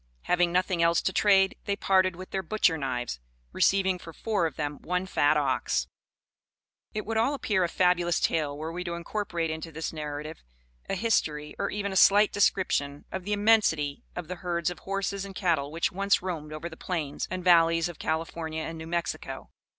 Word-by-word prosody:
Having 175 -1 +2
nothing 180 -1 +1
else 170 0 +4
to 190 - 0
trade, 195 -1 +4
they 200 - 0
parted 185 -2 +2
with 185 +1 -10
their 190 - -1
butcher 185 -2 +2
knives, 125 - -3 0.3
receiving 190 - +2
for 165 - -10
four 205 -1 0
of 150 - -9
them 145 -1 -3
one 180 +1 -1
fat 150 -5 +3
ox. 130 - 0 1.1
It 215 - -4
would 225 +1 -2
all 260 +6 +2
appear 210 -8 +1
a 175 - 0
fabulous 175 -1 +2
tale, 145 -3 0
were 160 +2 -4
we 180 +2 -4
to 170 -1 -3
incorporate 170 -2 -3
into 160 +1 -6
this 160 +1 -4
narrative 150 0 -6 0.5
a - - 0
history, 155 -9 0
or 200 - 0
even 200 -1 -3
a - - -5
slight 205 +2 +6
description 145 -8 +1
of 190 -1 -5
the 210 - -1
immensity 205 -9 +2
of 175 -2 -5
the 180 +1 -5
herds 175 -2 -1
of 175 - -9
horses 195 0 -3
and 195 -1 -8
cattle 165 -8 +1
which 165 +2 0
once 200 0 +1
roamed 160 -5 -4
over 155 +2 -5
the 165 - -9
plains 155 -6 -3
and 185 0 -4
valleys 165 -2 +5
of 175 -2 -9
California 160 0 -3
and 165 0 -6
New 160 - -7
Mexico. 170 0 -4
175 Hz, 190 wpm, -28 LUFS, 160-190 Hz, 1.1 s, slight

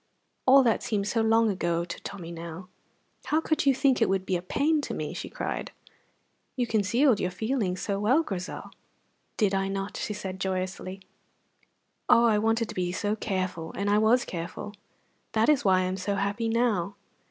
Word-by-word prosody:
All 270 +1 +8
that 230 -3 +2
seemed 205 -3 -1
so 225 +1 +1
long 225 0 +4
ago 170 -2 -1
to 175 - -7
Tommy 180 -4 -7
now! 170 +2 -8 0.6
"How 310 - +2
could 315 -2 0
you 270 - +5
think 265 -1 +2
it - - +4
would 190 -1 0
be 185 - 0
a 175 - -1
pain 295 - +1
to - - -4
me!" - - -4
she - - -6
cried. - - -4 0.9
"You 250 -2 0
concealed 230 +3 +2
your 180 - 0
feelings 190 -1 -2
so 200 -1 -1
well, 255 +10 +3
Grizel." 185 - -6 0.7
"Did 205 -3 +2
I 195 0 +1
not?" 195 +1 -4
she 210 - -3
said 190 -2 -6
joyously. 185 0 -3 1.1
"Oh, 235 - +6
I 215 -3 +4
wanted 225 +1 +1
to - - -5
be 180 -1 -1
so 205 +3 -1
careful, 185 -6 -3
and 200 +1 -1
I 210 - +4
was 235 +3 +4
careful. 170 +4 -6 0.6
That 225 +3 +3
is 295 -4 +4
why 185 -2 +4
I - - +1
am 185 +1 -2
so 200 +2 -2
happy 205 +3 -1
now." 220 -6 +1
205 Hz, 185 wpm, -27 LUFS, 185-230 Hz, 1.1 s, All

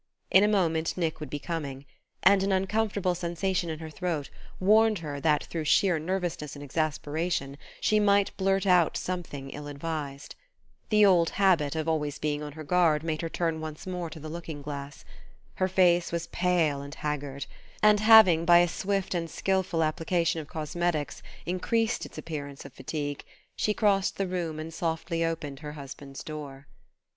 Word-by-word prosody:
In 190 - +7
a - - +5
moment 165 -6 +1
Nick 165 -3 -1
would 150 - -6
be 145 - -3
coming; 145 -4 -5 0.4
and 195 0 +6
an 195 +1 +1
uncomfortable 195 0 +1
sensation 175 +1 -1
in 160 - -3
her 160 0 -8
throat 160 -3 -3 0.3
warned 215 +3 +4
her 150 -4 -5
that 150 0 +2
through 160 -2 -4
sheer 175 +2 +3
nervousness 170 -3 -3
and 145 - -8
exasperation 150 0 -2 0.2
she 215 - +3
might 200 -1 +3
blurt 195 0 +1
out 180 -4 +4
something 160 -7 -5
ill 145 0 -7
advised. 145 -1 -5 0.6
The 210 -1 +6
old 175 -4 +5
habit 175 -7 +2
of 160 -1 -1 0.3
being 150 -1 -1
always - - -5
on 150 -1 -7
her 155 +1 -8
guard 160 -2 +3
made 160 -1 -2
her 165 - -3
turn 165 -1 -1
once 155 -1 -7
more 180 -2 -4
to 160 - -9
the 155 - -8
looking 160 -2 -7
glass. 140 -1 -7 0.5
Her 185 - +2
face 175 -2 +3
was 170 0 -2
pale 170 -7 +1
and 140 +2 -8
haggard; 145 -2 -4 0.4
and 210 -1 +6
having, 215 -7 +7
by 175 +1 +7
a 175 0 +5
swift 195 +2 -2
and 170 -2 -2
skilful 190 -4 0
application 165 +1 0
of 150 - -11
cosmetics, 155 -1 -2 0.2
increased 225 +6 0
its - - -15
appearance 145 -4 -6
of 140 - -11
fatigue, 145 0 -4 0.3
she 210 - 0
crossed 200 -3 +2
the 195 - 0
room 175 -4 -3
and 160 +1 -6
softly 165 0 -2
opened 155 -4 -3
her 150 -1 -7
husband's 140 -1 -9
door. 140 -3 -8
165 Hz, 170 wpm, -28 LUFS, 150-185 Hz, 0.6 s, In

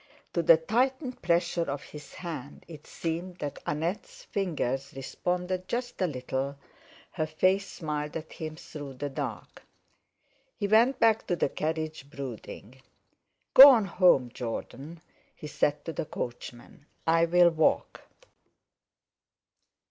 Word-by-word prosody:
To 170 - +1
the 165 0 +7
tightened 255 - -1
pressure 170 -2 +1
of 140 0 -4
his 150 -1 -12
hand 150 -6 -7
it 155 -3 -12
seemed 175 +2 -4
that 145 -4 -5
Annette's 195 - -3
fingers 140 - -2
responded 180 +7 -3
just 245 -2 -4
a 185 - +3
little; 135 0 -3 0.5
her 155 - -2
face 185 +5 +1
smiled 150 -2 -4
at 160 0 -9
him 155 -1 -6
through 145 -3 -9
the 145 +2 -4
dark. - - -6 1.0
He 205 - -1
went 230 +6 +4
back 225 -1 +3
to 175 - +1
the 150 - 0
carriage, 155 -2 -4
brooding. 130 -2 -8 0.7
"Go 275 +2 +12
on 230 -6 +5
home, 175 -10 +3
Jordan," 135 +7 -6 0.3
he - - -10
said 145 0 -1
to 165 - -4
the 155 - -3
coachman; 120 +3 -7 0.2
"I'll 170 +1 +4
walk." 160 -1 +1
160 Hz, 125 wpm, -28 LUFS, 145-185 Hz, 1.0 s, Go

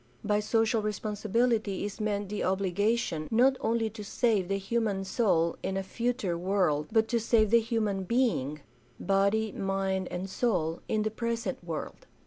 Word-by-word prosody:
By 210 0 +2
social 225 +1 +1
responsibility 215 0 0
is 205 +1 -6
meant 205 -2 -1
the 210 0 -2
obligation, 190 -2 0
not 255 +4 +4
only 225 0 +1
to 215 0 -8
save 205 -3 +1
the 195 +1 0
human 200 -1 -1
soul 175 -6 +1
in 190 - -2
a 195 - -1
future 230 -2 -1
world, 175 -5 +1
but 220 0 +3
to 235 - +2
save 220 -2 +3
the 235 - +7
human 220 -4 -1
being 185 - 0 0.2
— 120 0 -33
body, 200 +2 +2
mind, 195 -1 -1
and 180 +2 -4
soul 180 -6 -1
— - - -33
in 215 -1 +1
the 215 - -1
present 230 +1 -3
world. - - -6
210 Hz, 165 wpm, -29 LUFS, 190-225 Hz, 0.2 s, the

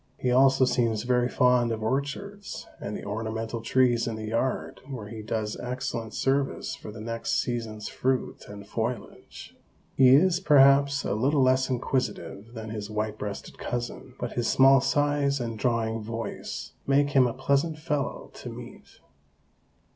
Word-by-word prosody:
He 125 - 0
also 135 +1 +5
seems 115 -4 +1
very 125 0 +2
fond 125 -2 +3
of 110 -1 -3
orchards 145 - -3
and 105 +1 -4
the - - -9
ornamental 110 +2 -3
trees 120 0 +2
in 115 - -2
the 110 0 -6
yard 120 +3 -2
where 115 -6 -6
he 110 0 -7
does 110 0 -3
excellent 125 -3 -4
service 135 +1 0
for 105 - -9
the 110 - -10
next 115 +1 -2
season's 115 -3 -3
fruit 130 0 -2
and 100 -1 -9
foliage. 115 0 -5 0.4
He 130 -1 +6
is, 175 +4 +4
perhaps, 140 -3 +5
a - - 0
little 135 +6 +2
less 130 +1 +3
inquisitive 125 -3 -3
than 110 -1 -6
his 105 -1 -5
white 110 0 -3
breasted 100 -1 -6
cousin, 120 +1 -5
but 120 - -3
his 120 -2 -1
small 135 0 +6
size 145 0 +1
and 115 -2 -4
drawling 115 -2 0
voice 115 +1 -5 0.2
make 140 +1 +3
him 135 -3 +5
a 120 - -3
pleasant 145 +3 +1
fellow 150 -4 -3
to - - -8
meet. - - -11
125 Hz, 155 wpm, -27 LUFS, 110-135 Hz, 0.4 s, He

